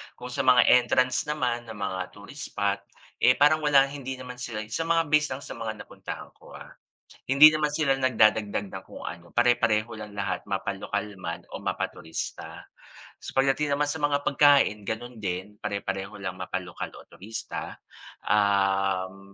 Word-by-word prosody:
Kung 125 0 -8
sa 135 0 -2
mga 125 -1 +7 0.2
entrance 125 +3 +1
naman 125 -5 -1
ng 110 - -8
mga 95 -2 -3
tourist 105 +8 -9
spot, 100 -1 0 0.4
eh, 125 - +5
parang 150 +2 +5
wala 145 -3 +5
hindi 135 -2 -6
naman 125 -1 -9
sila 115 -3 -4
sa 165 +7 -1
mga 165 0 +3
base 150 0 +4
lang 140 - -9
sa - - -9
mga 110 -2 -5
napuntahan - - -9
ko, - - -15
ah. - - -11 0.5
Hindi 140 +4 +9
naman 150 -1 0
sila 140 -4 +2
nagdadagdag 110 -5 +2
ng - - -8
kung - - -11
ano 85 +1 -8
pare-pareho 115 -2 +3
lang 105 -1 -8
lahat 100 -1 -3
mapalokal 100 +1 -3
man 85 -1 -5
o - - -6
mapaturista. 80 0 -5 0.6
Sa - - -7
pagdating 135 +2 +2
naman 145 0 +1
sa 160 - -2
mga 145 -1 +2
pagkain, 140 -7 +4
gano'n 120 +2 -5
din, 95 +2 -4
pare-pareho 100 0 -3
lang 95 -1 -4
mapalokal 90 -1 -5
o - - -13
turista, 110 +4 -6 0.5
um 95 -1 +1
115 Hz, 160 wpm, -27 LUFS, 100-135 Hz, 0.6 s, Hindi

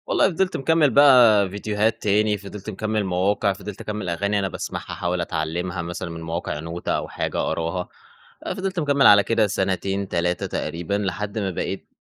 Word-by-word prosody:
والله - - +3
فضلت 185 +1 0
مكمّل 160 +1 +3
بقى 120 -7 +6
فيديوهات 105 +2 -1
تاني، 105 +1 +2
فضلت 100 +1 -9
مكمّل 110 +1 -2
مواقع، 100 +2 +1
فضلت 100 0 -8
أكمّل 105 -3 -4
أغاني 100 +4 0
أنا 95 - 0
باسمَعها - - -5
أحاول 90 0 -2
أتعلّمها 85 +3 -3
مثلًا 85 +1 -5
من 85 0 -7
مواقع، 80 -2 -4
نوتة 85 +2 -4
أو - - -1
حاجة - - -3
أقراها. 85 +2 -2 0.6
آآ، - - -2
فضلت 190 -1 -3
مكمّل 140 -3 +4
على 100 0 +7
كده 115 -1 +2
سنتين، 95 0 -1
3 90 0 -1
تقريبًا، 85 +3 -4
لحد 100 +2 -2
ما 100 -2 -1
بقيت - - -4
100 Hz, 170 wpm, -23 LUFS, 90-110 Hz, 0.6 s, على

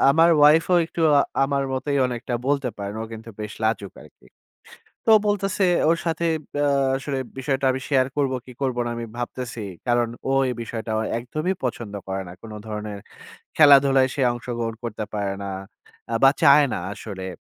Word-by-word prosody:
আমার 165 +3 +5
ওয়াইফও 160 +4 +5
একটু 170 - -6 0.2
আ - - +4 0.2
আমার 140 0 0
মতই 140 +2 -1
অনেকটা 120 0 -4
বলতে 140 -3 +1
পারেন। 100 +1 -5
ও - - -4
কিন্তু 110 +1 -9
বেশ 105 0 -5
লাজুক 110 -3 -1
আরকি। - - -19 0.8
তো - - -10
ও - - +6
বলতেছে 200 -1 0 0.3
ওর 165 - +3
সাথে 165 +1 0 0.3
ব্যা 145 0 +1 0.3
আসলে 135 0 -3 0.2
বিষয়টা 135 0 -1
আমি 130 - -4
শেয়ার 130 -3 +3
করবো 135 -3 +1
কি, 125 - -10
করবো 125 -2 0
না - - -2
আমি 115 0 -5
ভাবতেছি। 120 -1 -5 0.3
কারন 120 -1 +2 0.2
ও - - +2 0.2
এই 125 - -2
বিষয়টা 115 -1 -6 0.3
একদমই 155 +10 -2
পছন্দ 115 -4 -4
করে 95 0 -2
না। - - -9
কোন 110 -1 -9
ধরনের 105 -1 -5 0.6
খেলাধুলায় 135 -3 +6
সে 135 - -1
অংশগ্রহণ 120 -2 -4
করতে 110 -2 -4
পারে 100 -1 -1
না। 100 - -4 0.6
আ - - 0
বা, 135 - +8
চায় 145 0 +7
না - - -1
আসলে। 100 -3 -7
130 Hz, 175 wpm, -23 LUFS, 115-145 Hz, 0.8 s, বা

